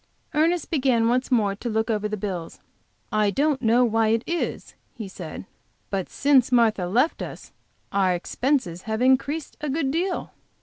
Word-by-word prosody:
Ernest 325 +3 +1
began 255 -7 +2
once 250 +2 +1
more 215 -6 +2
to 225 +4 -5
look 220 0 0
over 210 -1 0
the 215 - -3
bills. 185 -5 -5 0.5
"I 215 -1 +2
don't 285 +5 +1
know 240 +1 +4
how 225 0 0
it 225 +1 +2
is," 340 0 -3 0.2
he 220 -4 -6
said, 180 -1 -8 0.5
"but 195 -2 -2
since 275 -3 +3
Martha 220 -7 +3
left 250 - +1
us - - -8 0.4
our 190 -2 +2
expenses 180 - -1
have 220 +2 0
increased 275 +4 +1
a 300 - -2
good 275 -1 0
deal." 355 +4 -2
235 Hz, 165 wpm, -24 LUFS, 210-275 Hz, 0.5 s, know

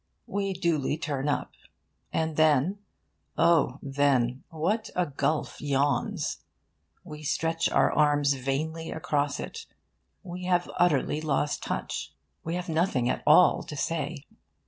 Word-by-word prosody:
We 195 -1 -2
duly 165 -6 0
turn 145 -3 -2
up. 145 - -1 0.6
And 160 -1 -1
then, 155 +5 +3 0.6
oh 160 -6 +3
then, 135 -3 +1
what 185 +7 -1
a 180 - +2
gulf 150 +1 -2
yawns! 140 - 0 0.6
We 150 0 -9
stretch 165 +2 0
our - - +3
arms 145 -1 +3
vainly 150 +5 -3
across 145 -2 -1
it. 455 0 -7 0.6
We 180 -1 -7
have 180 -1 +1
utterly 155 -3 +2
lost 150 -1 0
touch. - - -4 0.3
We 165 +2 -3
have 180 +1 -4
nothing 160 -7 +1
at - - -3
all - - +6
to - - -8
say. - - -3
155 Hz, 125 wpm, -27 LUFS, 140-170 Hz, 0.6 s, all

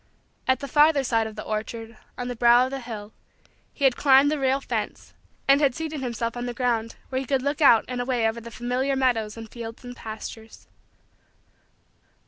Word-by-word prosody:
At 260 -1 +2
the 280 - -4
farther 295 +1 +4
side 225 -3 +1
of 220 - -9
the 215 - -6
orchard, 225 +1 -5 0.2
on 245 - -4
the 245 - -4
brow 240 +1 +5
of 260 - -5
the 275 - -3
hill, 220 -4 -8 0.6
he 280 - -7
had 265 -2 +5
climbed 275 +1 +5
the 305 - -1
rail 270 0 +2
fence - - -4 0.3
and 275 +2 +5
had 270 -4 +3
seated 315 -3 -4
himself 235 -2 -3
on 245 0 -4
the 240 - -5
ground 230 -3 -1
where 260 0 -1
he 265 - -7
could 270 -1 +1
look 285 +3 -1
out 235 -6 +6
and 250 -1 -3
away 245 -3 +1
over 225 +1 -3
the 235 - -9
familiar 250 +3 -1
meadows 230 -5 0
and 225 -1 -9
fields 230 0 -8
and 245 0 -8
pastures. 220 0 -9
245 Hz, 200 wpm, -25 LUFS, 230-270 Hz, 0.6 s, out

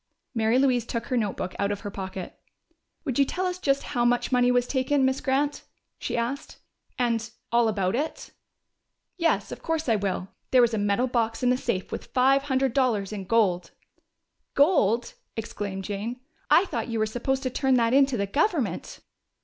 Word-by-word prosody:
Mary 225 0 +2
Louise 255 -3 +3
took 230 0 -4
her 255 - -2
notebook 205 -5 -1
out 200 0 +1
of 205 - -4
her 205 - -5
pocket. 190 -2 -6 0.7
"Would 265 -3 -1
you - - +7
tell 370 +7 -2
us 365 0 -2
just 275 -5 +1
how 245 -4 -1
much 245 +2 +2
money 245 -1 +4
was 245 0 +3
taken, 265 +1 +1
Miss 265 0 0
Grant?" 285 +2 0 0.4
she - - -3
asked. 240 +4 -3 0.4
"And 235 -2 0 0.2
all 235 0 +4
about 200 -2 0
it?" 300 +5 -3 0.9
"Yes, 335 -2 +1
of - - -7
course 325 -2 -2
I 225 - +4
will. 195 -2 -2 0.2
There 255 -2 +6
was 235 -1 +2
a 220 - 0
metal 205 +4 +2
box 230 -2 -1
in 250 - +4
the - - +3
safe 235 -7 -2
with - - -5
five 270 +2 +3
hundred 265 -2 +1
dollars 225 -7 +1
in 195 -2 -5
gold 185 -5 +2 0.4
" - - -53
"Gold!" 240 - +3 0.2
exclaimed 200 -3 -4
Jane. 210 +5 -4 0.3
"I 370 - +6
thought 235 - -3
you 230 - -2
were 215 - +2
supposed 260 +5 -2
to 255 - -1
turn 265 0 +2
that 235 -1 +2
in 275 0 +6
to 265 -3 -2
the 200 - 0
government!" 290 - -1
240 Hz, 190 wpm, -26 LUFS, 215-270 Hz, 0.9 s, you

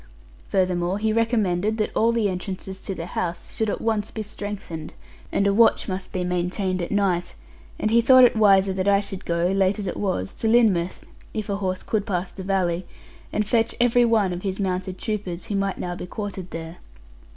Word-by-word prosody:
Furthermore, 180 0 +1
he 215 +1 0
recommended 220 -3 +1
that 215 - -2
all 230 +1 +3
the 230 -3 +1
entrances 190 0 -5
to 195 - -4
the 165 - -5
house 175 -1 -4
should 220 -1 0
at - - -3
once 220 -2 0
be 220 - -5
strengthened, 200 -6 -7 0.4
and 200 - +1
a 200 - +3
watch 230 +2 +4
must 185 -1 -4
be 185 - -2
maintained 180 +1 -1
at 170 - -3
night; 185 -4 0 0.4
and 215 - 0
he 235 +1 +5
thought 255 +2 +7
it 245 - +6
wiser 195 -3 +5
that 190 +1 -1
I 200 0 +5
should 200 -1 -6
go 170 +1 +1
(late 195 +1 +2
as 205 - -4
it 180 - -3
was) 140 - -2
to 225 - 0
Lynmouth, 210 -7 +3 0.3
if 215 -2 -3
a 200 - 0
horse 185 -2 -2
could 215 -2 -1
pass 180 -2 -2
the 195 - -8
valley, 185 -2 0 0.4
and 210 - 0
fetch 225 +2 +1
every 245 0 +4
one 220 -6 +2
of 175 - -5
his 190 0 -3
mounted 185 -1 -2
troopers, 195 -5 -4
who 215 -3 -3
might 195 -1 -1
now 175 - -3
be 180 - -7
quartered 195 -3 -5
there. 165 0 -7
195 Hz, 205 wpm, -24 LUFS, 180-215 Hz, 0.4 s, thought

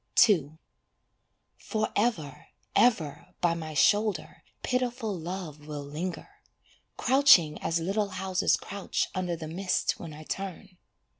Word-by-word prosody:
II 160 -7 +1 1.0
Forever, 205 - -2 0.3
ever 215 -12 +2
by 175 -1 +2
my 160 -2 -6
shoulder 195 -2 +2 0.2
pitiful 245 -4 -1
Love 165 -3 -6
will 150 -1 -5
linger, 180 - -6 0.6
Crouching 250 - +5
as 165 0 0
little 200 +5 -1
houses 190 -1 +1
crouch 200 0 -3
under 180 -2 -2
the 160 -1 -7
mist 180 +3 -1
when 165 - -7
I 155 +1 -10
turn. 190 +1 -6
180 Hz, 115 wpm, -28 LUFS, 155-210 Hz, 1.0 s, Crouching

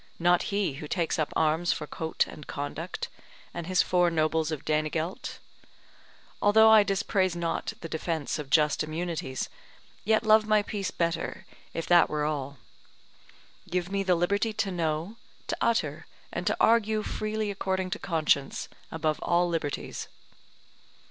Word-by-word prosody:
not 175 +1 +4
he 200 -6 0
who 150 - -6
takes 170 -1 -1
up 155 - 0
arms 160 +2 +2
for 150 - -2
coat 160 +2 -1
and 150 - -11
conduct, 150 +5 -4 0.5
and 170 -1 -5
his 185 -1 +3
four 180 -1 +3
nobles 160 -1 +1
of 155 -3 -4
Danegelt. 155 +3 -1 1.0
Although 220 +2 +7
I 220 -1 +9
dispraise 195 -2 +1
not 170 -1 -2
the 165 - -5
defence 160 -1 -2
of 145 -3 -6
just 150 +1 +3
immunities, 155 -4 -3 0.6
yet 220 +1 +3
love 215 0 +5
my 215 -1 +4
peace 200 -2 -3
better, 165 -1 -2 0.3
if 165 - -4
that 175 -1 +5
were 150 -1 -1
all. 140 -2 -3 1.1
Give 180 +1 -1
me 200 0 0
the 185 -2 +3
liberty 200 +6 +1
to 210 -2 -1
know, 165 +4 -2 0.3
to - - -2
utter, 235 -1 0 0.3
and - - -3
to - - +1
argue 220 -1 +3
freely 215 -1 -2
according 190 -1 -2
to 210 - -2
conscience, 155 -5 0 0.2
above 155 -1 -1
all 175 0 +2
liberties. 160 -4 -3
175 Hz, 150 wpm, -28 LUFS, 155-200 Hz, 1.1 s, I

